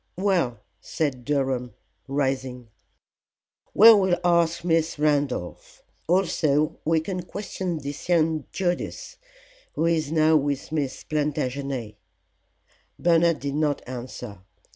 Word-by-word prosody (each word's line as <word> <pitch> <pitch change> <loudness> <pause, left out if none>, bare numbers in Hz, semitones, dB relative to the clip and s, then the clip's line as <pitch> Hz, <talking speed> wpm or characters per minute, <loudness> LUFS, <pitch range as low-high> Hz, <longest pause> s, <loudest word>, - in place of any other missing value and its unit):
"Well," 175 - 0 0.2
said 140 -7 -3
Durham, 130 -4 -1 0.3
rising, 130 -3 -2 1.1
"we 225 +2 +10
will 190 -4 +3
ask 170 -1 +2
Miss 165 -2 +1
Randolph. 145 -11 -1 0.2
Also 155 -4 +1
we 160 +1 +2
can 180 +2 -4
question 185 -1 -5
this 145 +3 -7
young 160 -2 +2
Judas, 195 - -3 0.6
who 160 - 0
is 160 -3 0
now 160 0 +4
with 140 -1 -2
Miss 140 -4 -2
Plantagenet." 140 -5 -3 1.0
Bernard 170 -1 +3
did 140 0 -3
not 150 -1 0
answer. 125 -4 -7
155 Hz, 105 wpm, -25 LUFS, 135-170 Hz, 1.1 s, we